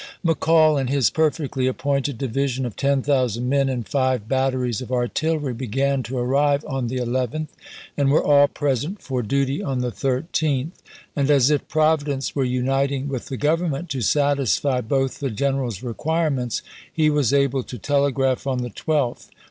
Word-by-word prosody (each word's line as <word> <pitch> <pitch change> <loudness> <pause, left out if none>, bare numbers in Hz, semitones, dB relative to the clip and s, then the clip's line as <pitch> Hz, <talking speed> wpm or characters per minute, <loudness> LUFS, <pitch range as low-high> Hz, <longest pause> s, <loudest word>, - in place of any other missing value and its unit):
McCall 160 -2 +4
and 130 - -2
his 140 -3 +2
perfectly 150 -4 0
appointed 140 0 -1
division 135 +1 -1
of 120 - -5
ten 140 -1 +1
thousand 125 -4 0
men 135 0 +2
and 125 -4 -3
five 130 -5 0
batteries 130 -3 0
of 130 - -8
artillery 140 +3 -1
began 135 +3 -1
to 125 +2 -5
arrive 140 +4 +1
on 135 -4 -2
the 130 +2 -3
11th, 125 +5 -2 0.5
and 140 -1 +2
were 145 - +3
all 145 -1 +5
present 145 - -2
for 130 -2 -3
duty 135 +4 0
on 130 -3 -2
the 125 -1 -2
13th; 140 +2 -1 0.4
and 140 -1 0
as 140 -1 +5
if 150 - 0
Providence 155 -3 +1
were 140 - +1
uniting 135 +2 0
with 130 -3 -4
the 135 - -5
Government 160 +2 0
to 130 - -2
satisfy 140 0 +1
both 135 +2 -1
the 140 - -2
general's 130 -3 -2
requirements, 135 - -1 0.3
he 155 -1 +2
was 145 -6 +2
able 140 -1 +2
to 125 - -8
telegraph 140 0 0
on 130 -2 -1
the 120 - -5
12th: 145 -6 -1
Ibid.. - - -29
135 Hz, 165 wpm, -22 LUFS, 125-145 Hz, 0.5 s, all